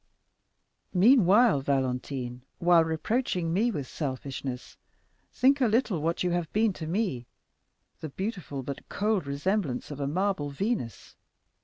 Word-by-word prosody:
Meanwhile, 210 - +5
Valentine, 130 -2 -2 0.2
while 170 -1 +5
reproaching 165 +1 -1
me 220 +7 +2
with 150 - -3
selfishness, 130 -2 -5 0.6
think 275 +2 +3
a 250 - +5
little 215 - +1
what 165 +3 -1
you 180 - +1
have 175 -2 -2
been 215 -1 +2
to 160 -3 -7
me—the 160 - -6
beautiful 185 - -5
but 140 +1 -7
cold 205 -6 0
resemblance 145 -1 -1
of 145 - -7
a 140 - -1
marble 180 -1 -1
Venus. 140 - -3
170 Hz, 125 wpm, -28 LUFS, 140-210 Hz, 0.6 s, Meanwhile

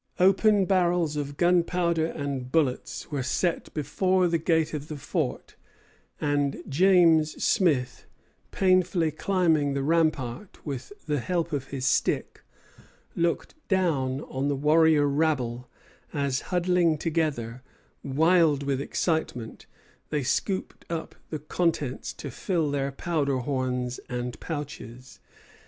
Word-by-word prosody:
Open 195 +2 +4
barrels 175 -4 +2
of 145 -1 -4
gunpowder 175 -2 +2
and 140 -5 -4
bullets 150 -2 -1
were 145 -2 -1
set 165 +7 -1
before 185 +4 +1
the 165 -1 +1
gate 160 -1 +1
of 150 -1 -4
the 155 -2 -6
fort, 145 0 -3 0.6
and 145 -2 0
James 165 -1 +4
Smith, 145 - +1 0.4
painfully 185 -3 +2
climbing 160 -4 +1
the 140 - -1
rampart 155 - -1
with 135 -1 -5
the 150 -2 0
help 170 +3 -2
of 135 -2 -2
his 135 -2 -4
stick, - - 0 0.7
looked 170 0 -1
down 145 -9 +1
on 135 -2 -3
the 145 - +1
warrior 150 +1 +4
rabble 135 -5 0 0.4
as, 140 -3 0
huddling 180 -3 +2
together, 145 -7 -2 0.4
wild 155 +1 +3
with 140 -1 -1
excitement, 140 -8 -2 0.4
they 150 -2 -1
scooped 185 +9 -2
up 165 -1 -4 0.2
the 155 - -3
contents 150 -3 -1
to 140 - -8
fill 160 +2 -1
their 140 -1 -1
powder 140 -2 -1
horns 125 -1 -2
and 125 0 -4
pouches. 140 -6 -7
150 Hz, 120 wpm, -26 LUFS, 135-170 Hz, 0.7 s, Open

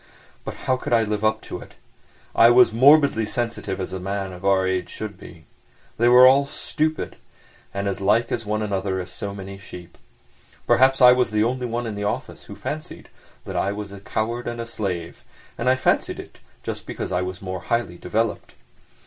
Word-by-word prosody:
But - - -6
how 130 - +2
could 125 - -3
I 115 -1 +5
live 105 0 -2
up 110 0 +2
to - - -6
it? - - -14 0.6
I 115 - +7
was 120 -1 +6
morbidly 140 -1 +5
sensitive 110 -3 -3
as 95 - -4
a 95 - -3
man 95 +1 -3
of 90 +1 -11
our 95 -1 +3
age 95 -1 -1
should 110 -2 -6
be. 80 -2 -14 0.5
They 120 - +4
were 125 +1 +8
all 140 +2 +6
stupid, 155 +2 -2 0.5
and 100 0 -3
as 100 0 -3
like 110 +4 +2
one 110 -2 -1
another 95 -2 -1
as 90 0 -6
so 100 +1 -6
many 100 0 -8
sheep. 90 -3 -12 0.7
Perhaps 130 +1 +4
I 125 - +10
was 125 -1 +3
the 105 -1 +1
only 125 +2 -1
one 120 +1 -3
in 110 - -4
the 105 0 -4
office 100 - -4
who - - -10
fancied - - -6 0.4
that - - -6
I 100 - 0
was 105 -1 -6
a 100 - -9
coward 115 +4 -3
and 120 0 -4
a 115 - -3
slave, 90 -7 -5 0.3
and 125 - 0
I 130 - +5
fancied 130 - 0
it - - -11 0.2
just - - -6
because - - -5
I 90 0 +1
was 90 +1 -4
more 95 -1 -5
highly 90 -3 -2
developed. 110 +4 -2
105 Hz, 200 wpm, -23 LUFS, 95-120 Hz, 0.7 s, I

